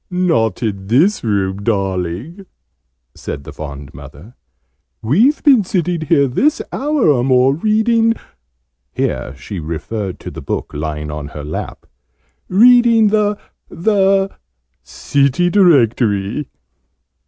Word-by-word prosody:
"Not 165 Hz, -, 0 dB
in 100 Hz, -3 st, -3 dB
this 160 Hz, -, +2 dB
room, 100 Hz, -3 st, -1 dB
darling!" 100 Hz, -, -3 dB, 0.7 s
said 70 Hz, -, -7 dB
the 70 Hz, -, -10 dB
fond 70 Hz, -2 st, -9 dB
mother. 75 Hz, -, -13 dB, 0.7 s
"We've 215 Hz, -, +2 dB
been 265 Hz, -8 st, +5 dB
sitting 175 Hz, -2 st, -1 dB
here 145 Hz, -3 st, +2 dB
this 295 Hz, -, +1 dB
hour 295 Hz, -1 st, 0 dB
or 130 Hz, -5 st, +2 dB
more, 130 Hz, 0 st, +3 dB
reading 225 Hz, +6 st, +1 dB, 0.4 s
," -, -, -53 dB
here 65 Hz, +3 st, -2 dB
she 95 Hz, +7 st, -7 dB
referred 85 Hz, +5 st, -5 dB
to -, -, -7 dB
the -, -, -9 dB
book -, -, -4 dB
lying 75 Hz, 0 st, -4 dB
on 75 Hz, -1 st, -6 dB
her 75 Hz, 0 st, -9 dB
lap, 75 Hz, -, -6 dB, 0.4 s
" -, -, -42 dB, 0.2 s
reading 230 Hz, +1 st, +5 dB
the 210 Hz, -1 st, +1 dB, 0.3 s
the 195 Hz, 0 st, +1 dB, 0.5 s
City 140 Hz, +5 st, 0 dB
Directory." 120 Hz, -, +2 dB
130 Hz, 120 wpm, -17 LUFS, -, 0.7 s, been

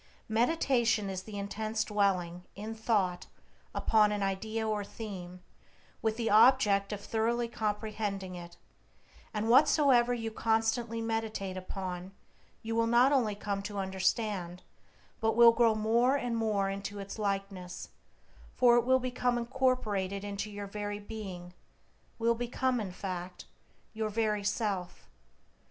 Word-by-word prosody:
Meditation 230 Hz, -4 st, +2 dB
is 185 Hz, -1 st, -4 dB
the 210 Hz, +1 st, -8 dB
intense 215 Hz, +2 st, -2 dB
dwelling, 185 Hz, -4 st, 0 dB
in 215 Hz, +3 st, -5 dB
thought, 210 Hz, -5 st, 0 dB, 0.5 s
upon 215 Hz, -2 st, +3 dB
an 205 Hz, -1 st, -1 dB
idea 220 Hz, +3 st, -2 dB
or 210 Hz, -1 st, -1 dB
theme, 185 Hz, -4 st, -8 dB, 0.6 s
with 220 Hz, 0 st, 0 dB
the 230 Hz, -1 st, -1 dB
object 210 Hz, -3 st, +5 dB
of 210 Hz, -, -3 dB
thoroughly 235 Hz, +3 st, 0 dB
comprehending 210 Hz, -3 st, -3 dB
it, 175 Hz, -1 st, -9 dB, 0.7 s
and 215 Hz, 0 st, -2 dB
whatsoever 250 Hz, -1 st, +5 dB
you 225 Hz, -2 st, -2 dB
constantly 225 Hz, +1 st, 0 dB
meditate 220 Hz, -4 st, -2 dB
upon 185 Hz, 0 st, -5 dB, 0.5 s
you 225 Hz, 0 st, -3 dB
will 230 Hz, 0 st, +2 dB
not 240 Hz, +4 st, +5 dB
only 235 Hz, -7 st, +2 dB
come 200 Hz, -1 st, -3 dB
to 205 Hz, +1 st, -6 dB
understand, 190 Hz, -1 st, -1 dB, 0.6 s
but 225 Hz, 0 st, +1 dB
will 235 Hz, 0 st, +9 dB
grow 230 Hz, -1 st, +3 dB
more 230 Hz, +5 st, +3 dB
and 245 Hz, -4 st, -1 dB
more 215 Hz, -3 st, +1 dB
into 200 Hz, +1 st, -4 dB
its 200 Hz, +2 st, -7 dB
likeness, 195 Hz, -3 st, -3 dB, 0.7 s
for 240 Hz, -1 st, +6 dB
it 240 Hz, -, +2 dB
will 260 Hz, +1 st, +5 dB
become 250 Hz, -1 st, 0 dB
incorporated 235 Hz, -6 st, 0 dB
into 205 Hz, +1 st, -4 dB
your 205 Hz, 0 st, -6 dB
very 205 Hz, +1 st, -4 dB
being, 195 Hz, -5 st, -8 dB, 0.6 s
will 230 Hz, 0 st, +2 dB
become, 245 Hz, +2 st, -1 dB
in 200 Hz, -4 st, -4 dB
fact, 180 Hz, -1 st, -6 dB, 0.5 s
your 220 Hz, -1 st, -2 dB
very 210 Hz, -1 st, 0 dB
self. 200 Hz, -3 st, -2 dB
215 Hz, 135 wpm, -31 LUFS, 195-230 Hz, 0.7 s, will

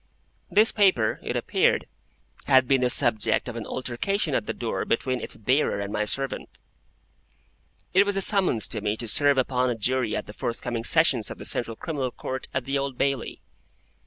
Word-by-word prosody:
This 215 Hz, +2 st, +4 dB
paper, 185 Hz, -, +2 dB
it -, -, -4 dB
appeared, -, -, +1 dB, 0.6 s
had 130 Hz, -2 st, +4 dB
been 135 Hz, -1 st, +3 dB
the 125 Hz, -, +2 dB
subject 115 Hz, -4 st, +2 dB
of 120 Hz, -, -6 dB
an 115 Hz, -2 st, -6 dB
altercation 140 Hz, -, -2 dB
at 110 Hz, -, -1 dB
the -, -, -1 dB
door 115 Hz, -2 st, -3 dB
between 130 Hz, +1 st, -1 dB
its -, -, -4 dB
bearer 125 Hz, +1 st, +1 dB
and 100 Hz, +1 st, -5 dB
my 105 Hz, 0 st, 0 dB
servant. 135 Hz, +5 st, -3 dB, 1.3 s
It 190 Hz, +2 st, +6 dB
was 200 Hz, -1 st, -1 dB
a -, -, +2 dB
summons 190 Hz, -, +3 dB
to 110 Hz, -, -3 dB
me 105 Hz, +1 st, -1 dB
to 120 Hz, -, -4 dB
serve 140 Hz, +5 st, +4 dB
upon 130 Hz, -1 st, +1 dB
a 120 Hz, -, -1 dB
Jury 120 Hz, 0 st, 0 dB
at -, -, -3 dB
the 105 Hz, -, -10 dB
forthcoming 115 Hz, +1 st, -3 dB
Sessions 135 Hz, -, +3 dB
of -, -, -8 dB
the -, -, -9 dB
Central 115 Hz, -2 st, -1 dB
Criminal 140 Hz, -1 st, -3 dB
Court 130 Hz, +1 st, -6 dB
at 130 Hz, -2 st, -3 dB
the 140 Hz, +1 st, -1 dB
Old 135 Hz, -2 st, -4 dB
Bailey. 135 Hz, -3 st, -2 dB
130 Hz, 190 wpm, -25 LUFS, 115-140 Hz, 1.3 s, It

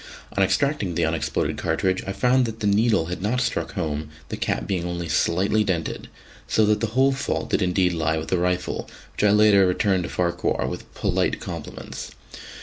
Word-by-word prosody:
On 95 Hz, -, +3 dB
extracting 105 Hz, -, +1 dB
the 85 Hz, -, +2 dB
unexploded 80 Hz, -1 st, -1 dB
cartridge, 95 Hz, 0 st, 0 dB
I -, -, -1 dB
found 125 Hz, +5 st, +3 dB
that 115 Hz, -1 st, -5 dB
the 105 Hz, -, -3 dB
needle 105 Hz, -3 st, +3 dB
had 90 Hz, +1 st, -5 dB
not 110 Hz, +6 st, 0 dB
struck 120 Hz, -2 st, -1 dB
home, 75 Hz, -5 st, -3 dB, 0.2 s
the -, -, -3 dB
cap 60 Hz, -1 st, -1 dB
being 90 Hz, +2 st, -1 dB
only 85 Hz, -1 st, -3 dB
slightly 95 Hz, +7 st, +2 dB
dented; 90 Hz, -5 st, -2 dB, 0.4 s
so 110 Hz, -, +3 dB
that 105 Hz, 0 st, +2 dB
the 115 Hz, -, 0 dB
whole 135 Hz, +1 st, +5 dB
fault 135 Hz, 0 st, -2 dB
did -, -, +2 dB
indeed 90 Hz, 0 st, +2 dB
lie 80 Hz, -1 st, 0 dB
with 80 Hz, -, -5 dB
the 90 Hz, -, +1 dB
rifle, 90 Hz, 0 st, -1 dB, 0.2 s
which -, -, -4 dB
I 105 Hz, -, +6 dB
later 105 Hz, -2 st, +5 dB
returned 95 Hz, +1 st, +1 dB
to -, -, -6 dB
Farquhar 85 Hz, -1 st, 0 dB
with -, -, -6 dB
polite -, -, 0 dB
compliments. -, -, -7 dB
95 Hz, 190 wpm, -24 LUFS, 85-105 Hz, 0.4 s, I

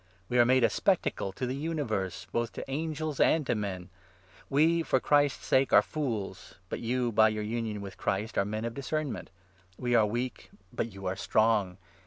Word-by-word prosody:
We 125 Hz, -, +2 dB
are 120 Hz, -, +7 dB
made 130 Hz, +1 st, +4 dB
a -, -, +5 dB
spectacle 95 Hz, -, 0 dB
to 130 Hz, -, -3 dB
the 125 Hz, -, -2 dB
universe, 140 Hz, -, -2 dB
both 120 Hz, 0 st, -1 dB
to -, -, -5 dB
angels 155 Hz, +1 st, -3 dB
and 160 Hz, -3 st, +4 dB
to 125 Hz, -, +1 dB
men! 95 Hz, -5 st, -4 dB, 0.6 s
We, 160 Hz, +4 st, +3 dB
for 130 Hz, -, +1 dB
Christ's 145 Hz, 0 st, +2 dB
sake, 130 Hz, +1 st, +3 dB
are -, -, +7 dB
'fools,' 115 Hz, -11 st, -4 dB
but -, -, -3 dB
10 -, -, -8 dB
you, 120 Hz, 0 st, 0 dB
by 110 Hz, 0 st, +5 dB
your 110 Hz, 0 st, -3 dB
union 110 Hz, -1 st, -3 dB
with 95 Hz, -1 st, -8 dB
Christ, 105 Hz, +4 st, -2 dB
are -, -, +3 dB
men 110 Hz, +3 st, -3 dB
of 115 Hz, -, -3 dB
discernment. 140 Hz, +1 st, -3 dB, 0.5 s
We 120 Hz, -1 st, -1 dB
are 110 Hz, -3 st, +5 dB
weak, 120 Hz, +4 st, -4 dB, 0.2 s
but 115 Hz, -, -2 dB
you 95 Hz, 0 st, -10 dB
are 95 Hz, +1 st, -1 dB
strong. 105 Hz, -5 st, +2 dB
120 Hz, 195 wpm, -29 LUFS, 105-135 Hz, 0.6 s, are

